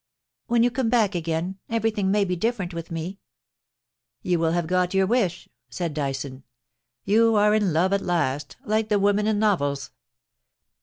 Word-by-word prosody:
* - - -63
When 235 0 +3
you 245 - +3
come 250 -2 -1
back 220 -4 +2
again 170 +2 -3
everything 225 -3 0
may 205 0 +2
be 180 -1 -1
different 195 -2 -2
with 165 0 -6
me.' 170 +4 -5 0.5
* 120 0 -66
You 180 -2 +1
will 165 0 +1
have 175 -1 0
got 180 +2 0
your 190 0 +4
wish,' 190 -5 0 0.2
said 170 -4 -3
Dyson. 135 -2 -4 0.3
* 115 0 -58
You 225 +2 +4
are 210 0 +4
in 210 -4 +2
love 175 +5 +2
at 200 - +1
last, 150 -6 -1
like 215 0 0
the 210 - +3
women 205 +1 +2
in 215 -1 +1
novels. 145 -10 0
185 Hz, 185 wpm, -24 LUFS, 160-210 Hz, 0.5 s, your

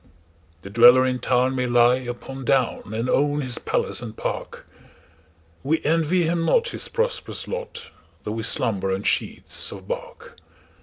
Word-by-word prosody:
The 100 - -9
dweller 120 +3 +7
in 125 -1 -1
town 130 +1 +1
may 125 -1 0
lie 120 +1 +4
upon 130 +1 -7
down, 125 -5 0
And 115 +3 -2
own 145 +3 +1
his 125 -3 -1
palace - - -1
and 115 -2 -8
park:We 80 - -7
envy 165 +3 +2
him 165 +1 0
not 475 - +2
his - - -4
prosperous 475 0 -2
lot, - - -6 0.3
Though 105 - -4
we 110 +1 -3
slumber 100 -3 0
on 95 +1 -2
sheets - - -1
of - - -10
bark. - - -7
125 Hz, 150 wpm, -23 LUFS, 115-150 Hz, 0.3 s, dweller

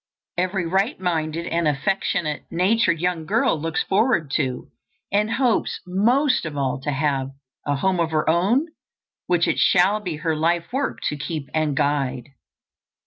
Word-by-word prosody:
Every 185 +1 -1
right 190 +6 0
minded 165 -2 -1
and 170 -1 0
affectionate 150 0 -1
natured 185 -1 +2
young 175 -2 -1
girl 155 - +1
looks 165 0 -1
forward 195 - +1
to, 130 -4 -2 0.4
and 210 +3 +1
hopes 250 -4 +1
most 240 +10 +2
of 150 -3 -5
all 135 0 -1
to 145 - -3
have, 135 -2 0 0.4
a 145 - +1
home 185 +5 0
of 165 -1 +1
her 155 -1 0
own, 195 - +3 0.6
which 175 -1 +2
it - - 0
shall 190 +4 +4
be 180 -6 -4
her 160 +1 -1
life 170 +5 0
work 275 +1 -2
to 150 - -4
keep 150 0 -5
and 155 -2 0
guide. 140 -4 0
165 Hz, 155 wpm, -23 LUFS, 150-190 Hz, 0.6 s, shall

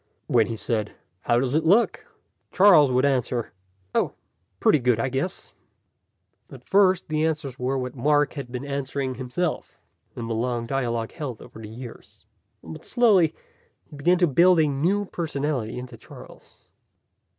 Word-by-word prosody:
When 115 -3 +3
he 115 -1 -4
said, 110 -1 -2 0.3
"How 120 - +3
does 130 0 -1
it 155 +1 +2
look?" 200 +9 +3 0.5
Charles 185 -8 +6
would 130 +2 +2
answer, 125 -3 -1 0.4
"Oh, - - 0 0.5
pretty 155 - +4
good, 125 -2 +1
I 115 - 0
guess." 135 +9 -4 1.0
At - - -12
first 190 -2 +3
the 155 0 -1
answers 150 -5 -2
were 130 +2 -1
what 125 -1 -4
Mark 145 +3 +2
had 135 -4 -7
been 125 +2 -5
answering 140 -1 -3
himself, 130 +7 -4 0.4
in 115 - -5
the 115 - -2
long 120 +1 -2
dialogue 120 -3 -2
held 130 -8 -6
over - - -13
the 110 -1 -9
years. 120 +1 -12 0.4
But, 80 -1 -10
slowly, 200 - +3 0.6
he - - -10
began 175 +6 +2
to 175 -1 +3
build 170 +4 +5
a 155 - +4
new 170 +9 0
personality 145 - -3
into 125 0 -8
Charles. - - -15
135 Hz, 155 wpm, -24 LUFS, 125-160 Hz, 1.0 s, Charles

